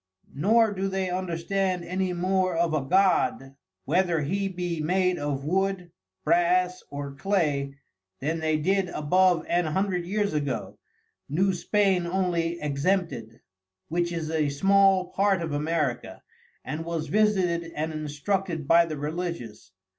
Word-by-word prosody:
Nor 220 - +3
do 195 0 -2
they 190 -1 -2
understand 180 +1 -1
any 185 +1 -1
more 185 0 0
of 170 -1 +1
a 155 - +1
God, 155 -4 +2 0.3
whether 170 +1 +1
he 195 +7 -1
be 175 -3 -3
made 180 +2 +1
of 145 -1 -3
Wood, 185 +1 -1 0.3
Brass 180 +2 +2
or 140 -1 -6
Clay, 140 -4 0 0.4
then 160 +4 -2
they 155 -1 +1
did 190 +4 +1
above 180 +3 +2
an 175 0 +1
hundred 180 +2 0
years 205 0 -1
ago, 145 -3 -3 0.5
New 190 +7 +2
Spain 190 -1 +1
only 170 -2 -1
exempted, 145 - -1 0.5
which 170 +1 0
is 160 -2 -3
a 155 -2 +1
small 195 +4 +3
part 195 -1 +2
of 160 - -4
America, 150 -4 -2 0.4
and 155 +2 -4
was 165 -1 -3
visited 185 -5 +1
and 155 +1 -2
instructed 155 +2 -2
by 170 +1 +5
the 155 -2 -5
Religious. 150 - -5
175 Hz, 135 wpm, -26 LUFS, 155-190 Hz, 0.5 s, by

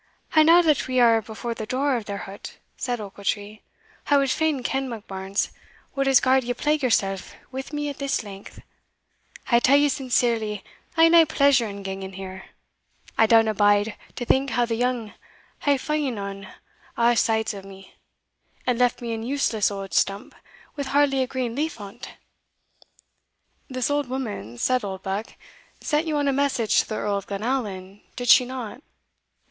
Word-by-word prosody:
"And 310 -1 +6
now 345 +2 +7
that 305 -4 +2
we 255 -1 +1
are 230 -2 +5
before 220 +2 -5
the 220 -1 -6
door 270 +2 +1
of 230 -3 -3
their 200 -1 -5
hut," 200 0 -10 0.2
said 245 -2 -3
Ochiltree, 205 +1 -4 0.5
"I 290 - +5
wad 275 -1 +2
fain 310 -4 0
ken, 265 +1 -1
Monkbarns, 195 -3 -3 0.4
what 275 -1 0
has 270 -2 +6
gar'd 260 0 +3
ye 245 +1 -2
plague 300 +4 0
yoursell 195 -6 +1 0.3
wi' 265 +1 -4
me 295 -1 -2
a' 285 - -3
this 275 -3 -2
length? 200 -1 -11 0.9
I 235 - +6
tell 270 +3 +5
ye 290 0 +4
sincerely 235 -6 0 0.3
I 325 - +6
hae 330 - +7
nae 335 -1 +7
pleasure 280 -6 +3
in 200 -1 -7
ganging 195 0 -5
in - - -10
there. 190 0 -8 0.7
I 225 - +4
downa 225 -1 +5
bide 205 +1 +3 0.2
to 245 - -4
think 270 +3 +2
how 240 +1 +1
the 230 - -3
young 240 -2 -1 0.5
hae 285 -1 +2
fa'en 290 -3 -2
on 200 -1 -6 0.5
a' 235 +1 +4
sides 220 -1 +1
o' 200 - -7
me, 195 0 -13 0.7
and 250 -1 0
left 245 0 +2
me 230 -1 -3
an 225 - -4
useless 235 -4 +1
auld 195 -1 -6
stump 195 +1 0 0.4
wi' 285 - -3
hardly 275 -1 +2
a 260 - 0
green 255 -3 -3
leaf 300 +1 -2
on't." 205 +4 -9 1.6
"This 255 +1 -1
old 290 -3 0
woman," 210 - -5
said 255 - +1
Oldbuck, 195 +2 -4 0.4
"sent 305 +2 0
you 305 -1 0
on 290 -1 +1
a 275 - +2
message 265 -5 +2
to - - -1
the 215 - -2
Earl 205 -1 -1
of 200 - -7
Glenallan, 200 -3 -3
did 245 0 -3
she 250 - +8
not?" 250 -1 -7
240 Hz, 175 wpm, -24 LUFS, 205-270 Hz, 1.6 s, she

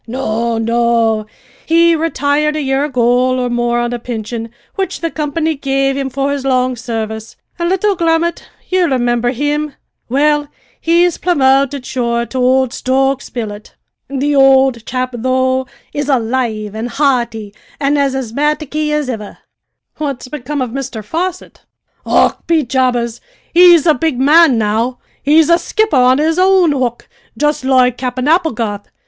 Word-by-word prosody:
"No, 230 -1 -2
no; 230 -1 +1 0.4
he 335 +1 +4
retired 300 -1 0
a 305 - -1
year 270 +1 0
ago 250 -1 +1
or 250 -1 -1
more 240 0 0
on 240 0 -2
a 240 - -3
pinsion 230 -1 -5 0.2
which 385 -1 -3
the 330 -1 -3
company 315 +1 -1
gave 275 -1 0
him 270 -1 -2
for 275 +2 -1
his 280 -1 -3
long 255 -1 +1
service; 220 -2 -5 0.2
an' 340 0 0
little 385 +2 +1
Grummet 335 0 0 0.2
ye 370 - 0
rimimber 245 -6 +1
him? 290 +2 -2 0.3
well, 295 +3 +2 0.3
he's 340 +1 +2
promoted, 275 -5 +2
sure, 235 -2 -1
to 260 - -5
ould 260 0 +2
Stokes' 270 +1 0
billet. 215 -3 -7 0.3
The 280 +2 -1
ould 265 -4 +4
chap, 255 0 -2
though, 260 +1 0 0.3
is 290 0 -3
alive 230 -4 -1
an' 220 +2 -4
hearty, 235 -6 -1 0.3
an' 280 +1 +1
as 280 -2 +1
asthamataky 300 +4 -1
as 300 -2 -1
ivver!" 220 -5 -6 0.6
"What's 280 -4 -4
become 285 0 -4
of 245 - -5
Mr 260 -4 -5
Fosset?" 355 +6 -4 0.5
"Och, - - +2
be 330 -2 +2
jabbers! 245 -2 -1 0.3
he's 345 -3 +7
a 320 - +5
big 300 -2 -1
man 295 -1 +5
now. 225 +4 0 0.2
He's 305 +2 +4
a 340 - +5
skipper 435 -3 0
on 255 0 +4
his 320 +3 +1
own 370 -3 +4
hook, 250 -4 -2 0.3
jist 295 -2 0
loike 255 -2 +2
Cap'en 255 +1 -2
Applegarth. 235 - 0
265 Hz, 150 wpm, -15 LUFS, 240-300 Hz, 0.6 s, he's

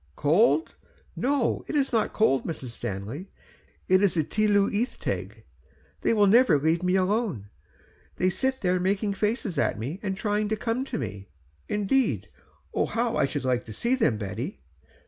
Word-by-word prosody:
"Cold! 205 - +3 0.4
no. 270 -1 0
It - - -4
is 275 -3 +1
not 220 -2 +2
cold, 135 -12 +2
Mrs. 145 -6 -5
Stanley; 115 - -6 0.6
it 185 +1 +4
is 200 -3 +3
the 160 - +2
Tylwyth 210 - +1
Teg; - - -4 0.6
they - - +2
never 210 - +5
will 140 - -5
leave 165 +2 +2
me 180 0 +1
alone, 185 - 0 0.6
there - - -1
they - - +5
sit 260 +6 -1 0.2
making 200 +2 0
faces 210 - -1
at - - +1
me, 135 - -5
and 195 -2 -3
trying 210 0 0
to 220 - +1
come 230 +4 -2
to - - -4
me." 100 -6 -6 0.4
"Indeed! 210 +6 +1 0.4
oh - - +1
how 235 0 -1
I 140 - +2
should 140 -1 -4
like 125 -1 +1
to 110 - -8
see 235 - 0
them, 220 - +2
Betty." 95 -9 -5
195 Hz, 165 wpm, -26 LUFS, 140-225 Hz, 0.6 s, never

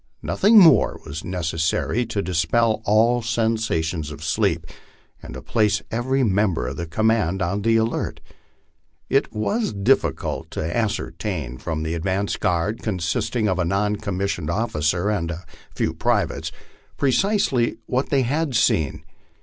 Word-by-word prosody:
Nothing 215 +3 +4
more 180 -6 +6
was 80 +2 -6
necessary 90 +6 -1
to 105 -3 -2
dispel 110 +6 +1
all 115 +4 +3
sensations 110 -9 -1
of 75 +1 -9
sleep, 80 - 0 0.6
and - - -9
to - - -8
place 105 -2 +1
every 130 +4 0
member 95 - +1
of - - -4
the 85 - -4
command 110 0 +1
on 100 +4 -1
the 115 +2 +2
alert. 115 0 -1 0.9
It - - +2
was 210 - -1
difficult 105 +7 0
to 80 +2 -2
ascertain 90 - -3
from 80 -1 -3
the 80 +1 -2
advance 95 +4 -1
guard, 90 +6 -1
consisting 105 +3 -1
of 95 -1 0
a - - +2
non 105 +4 0
commissioned 100 -6 -3
officer 90 -1 0
and 85 -6 -1
a 85 0 -6 0.3
few - - 0
privates, - - -1 0.5
precisely 135 - +1
what 130 +2 -1
they 135 -2 +2
had 145 +2 -1
seen. 80 -10 +1
105 Hz, 140 wpm, -22 LUFS, 85-115 Hz, 0.9 s, more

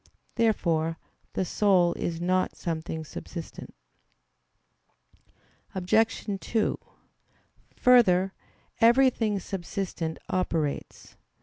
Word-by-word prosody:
Therefore 165 -8 +1 0.4
the 190 - -1
soul 180 -3 +3
is 165 -1 -3
not 185 +1 0
something 160 -1 -4
subsistent. 165 +2 -8 2.0
Obj. 220 +5 +1
2: 220 +1 -1 1.0
Further, 195 -7 +4 0.5
everything 230 -3 +4
subsistent 175 -3 -4
operates. 165 -6 -3
185 Hz, 70 wpm, -27 LUFS, 165-215 Hz, 2.0 s, Further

